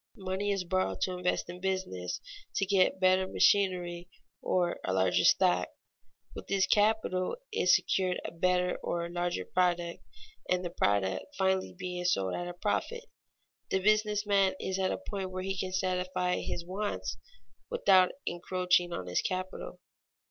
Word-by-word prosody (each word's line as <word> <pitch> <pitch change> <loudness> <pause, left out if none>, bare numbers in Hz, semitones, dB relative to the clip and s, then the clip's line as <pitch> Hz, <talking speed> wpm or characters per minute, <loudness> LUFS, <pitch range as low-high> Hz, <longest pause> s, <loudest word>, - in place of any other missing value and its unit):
Money 190 +1 -2
is 195 -2 -1
borrowed 185 +1 -1
to 185 0 0
invest 180 0 -1
in 175 +1 -8
business, 185 - -3 0.3
to 195 - +1
get 190 -1 +3
better 185 0 +3
machinery 180 -3 +2 0.3
or 175 -2 0
a - - -1
larger 95 -1 +2
stock; - - +4 0.7
with - - -9
this 195 -1 +2
capital 205 -2 +2 0.2
is 455 - +5
secured 185 -1 0
a - - -4
better 180 +1 +1
or 170 0 -3
larger 175 - -2
product, 175 -2 0 0.5
and 180 0 +1
the 175 - -3
product 100 - +1
finally 190 -1 0
being 180 -1 -4
sold 95 - +1
at 175 - -3
a 175 - -5
profit, 470 - -2 0.7
the - - +2
business 210 +1 +2
man 195 -2 +3
is 190 0 -2
at 190 0 +1
a - - -1
point 195 -2 -5
where 185 0 -5
he 195 0 -2
can 185 -1 -3
satisfy 185 -1 0
his 170 - -4
wants 185 - -3 0.5
without 185 -2 +5 0.2
encroaching 180 0 +1
on 95 - -4
his 90 0 0
capital. 185 - -4
185 Hz, 155 wpm, -30 LUFS, 175-190 Hz, 0.7 s, is